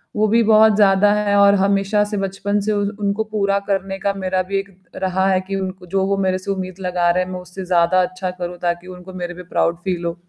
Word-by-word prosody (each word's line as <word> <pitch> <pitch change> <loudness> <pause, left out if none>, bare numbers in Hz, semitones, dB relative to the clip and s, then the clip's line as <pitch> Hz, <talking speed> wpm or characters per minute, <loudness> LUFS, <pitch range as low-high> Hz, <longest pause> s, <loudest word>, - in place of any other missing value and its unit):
वो 215 0 +2
भी 230 +2 +3
बहुत 220 0 +5
ज़्यादा 205 0 +4
है 210 -1 +1
और 200 0 +6
हमेशा 200 +1 +2
से 210 0 -4
बचपन 195 +1 -1
से 215 +2 -1
उनको 205 0 -1
पूरा 200 -2 0
करने 195 -1 -2
का 200 0 0
मेरा 185 -1 -1
भी 195 - 0
एक 200 - -7 0.3
रहा 190 0 0
है 185 -1 +3
कि 195 - -3
उनको 185 -1 -5
जो 190 +2 0
वो 195 0 0
मेरे 185 -1 +1
से 185 +1 -4
उम्मीद 185 -1 -5
लगा 180 -2 0
रहे 180 +1 +2
हैं, 180 - -8
मैं 185 - -5
उससे 180 +1 -9
ज़्यादा 180 +1 +3
अच्छा 185 +1 -3
करूँ 180 -1 -6
ताकि 175 +1 -2
उनको 185 0 -11
मेरे 175 -1 -5
पे 180 +1 -10
प्राउड 170 -1 0
फील 180 -3 -2
हो। 170 - -1
195 Hz, 240 wpm, -20 LUFS, 185-200 Hz, 0.3 s, और